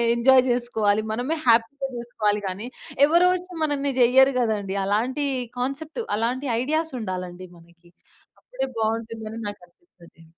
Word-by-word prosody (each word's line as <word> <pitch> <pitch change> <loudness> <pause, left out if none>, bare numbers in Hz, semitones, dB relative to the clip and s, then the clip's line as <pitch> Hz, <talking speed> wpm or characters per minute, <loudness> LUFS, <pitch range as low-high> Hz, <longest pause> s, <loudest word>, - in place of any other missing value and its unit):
Enjoy 255 +2 +6
చేసుకోవాలి. 220 -4 +1
మనమే 250 +8 -1
హ్యాపీగా 235 +4 +3
చేసుకోవాలి 215 -3 -1
గానీ, 195 +6 -5 0.4
ఎవరోచ్చి 360 +3 +2
మనన్ని 285 -2 0
జెయ్యరు 265 +3 +6
గదండీ. 210 -5 -1
అలాంటీ 250 +8 0 0.3
కాన్సెప్ట్ 295 - -3 0.2
అలాంటి 250 +5 -1 0.2
ఐడియాసుండాలండి 215 - -3
మనకి. 170 +1 -21 0.5
అప్పుడే 380 - -4
బావుంటుందని 225 0 -3
నాకనిపిస్తది. 175 - -13
235 Hz, 105 wpm, -24 LUFS, 210-275 Hz, 0.5 s, Enjoy